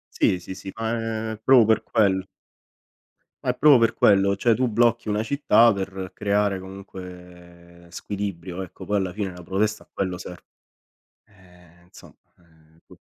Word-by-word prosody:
Sì, 90 Hz, -, +2 dB
sì, 90 Hz, +2 st, -8 dB
sì, 95 Hz, 0 st, -9 dB
ma 115 Hz, 0 st, -3 dB
è 110 Hz, -, -7 dB
proprio 130 Hz, -4 st, +6 dB
per 110 Hz, 0 st, +2 dB
quello. 95 Hz, -4 st, +1 dB, 1.2 s
Ma -, -, 0 dB
è 125 Hz, -, -1 dB
proprio 150 Hz, -4 st, +7 dB
per 115 Hz, -, +3 dB
quello, 100 Hz, -1 st, +3 dB
cioè 115 Hz, +1 st, +2 dB
tu 125 Hz, +1 st, 0 dB
blocchi 115 Hz, 0 st, +1 dB
una 105 Hz, +1 st, 0 dB
città 120 Hz, -3 st, +4 dB
per 95 Hz, -1 st, -5 dB
creare 100 Hz, -2 st, 0 dB
comunque 90 Hz, -2 st, -12 dB
squilibrio, 95 Hz, -2 st, -5 dB
ecco 90 Hz, -, -9 dB
poi 105 Hz, -, -1 dB
alla 95 Hz, -3 st, 0 dB
fine 95 Hz, -1 st, -4 dB
la 90 Hz, -1 st, -11 dB
protesta 105 Hz, +4 st, -1 dB
a -, -, -33 dB
quello 90 Hz, -2 st, -3 dB
serve. 90 Hz, 0 st, -10 dB, 0.8 s
Eh, 90 Hz, -3 st, -22 dB
insomma 90 Hz, -, -16 dB, 0.3 s
eh, 80 Hz, -1 st, -27 dB
c -, -, -18 dB
95 Hz, 160 wpm, -23 LUFS, 90-110 Hz, 1.2 s, proprio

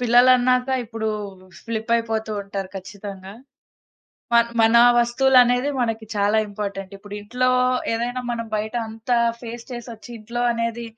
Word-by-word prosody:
పిల్లలన్నాక 250 Hz, +1 st, +4 dB, 0.2 s
ఇప్పుడు 220 Hz, -1 st, -4 dB, 0.5 s
స్లిప్పయిపోతూ 225 Hz, -1 st, -1 dB
ఉంటారు 195 Hz, -1 st, -5 dB
ఖచ్చితంగా. 195 Hz, 0 st, -9 dB, 1.0 s
మ -, -, +6 dB, 0.2 s
మన 225 Hz, +1 st, +5 dB, 0.2 s
వస్తువులనేది 245 Hz, +1 st, +4 dB
మనకి 225 Hz, -2 st, -2 dB
చాలా 205 Hz, +1 st, +2 dB
ఇంపార్టెంట్ 200 Hz, -2 st, -5 dB
ఇప్పుడింట్లో 205 Hz, +5 st, -3 dB, 0.4 s
ఏదైనా 240 Hz, +2 st, -2 dB
మనం 230 Hz, -1 st, -3 dB
బయట 215 Hz, +3 st, -4 dB
అంతా 225 Hz, +2 st, -2 dB, 0.2 s
ఫేస్ 235 Hz, 0 st, -8 dB
చేసొచ్చి 240 Hz, -1 st, -8 dB
ఇంట్లో 235 Hz, +3 st, -5 dB
అనేది 230 Hz, 0 st, -3 dB
230 Hz, 110 wpm, -22 LUFS, 210-240 Hz, 1.0 s, మ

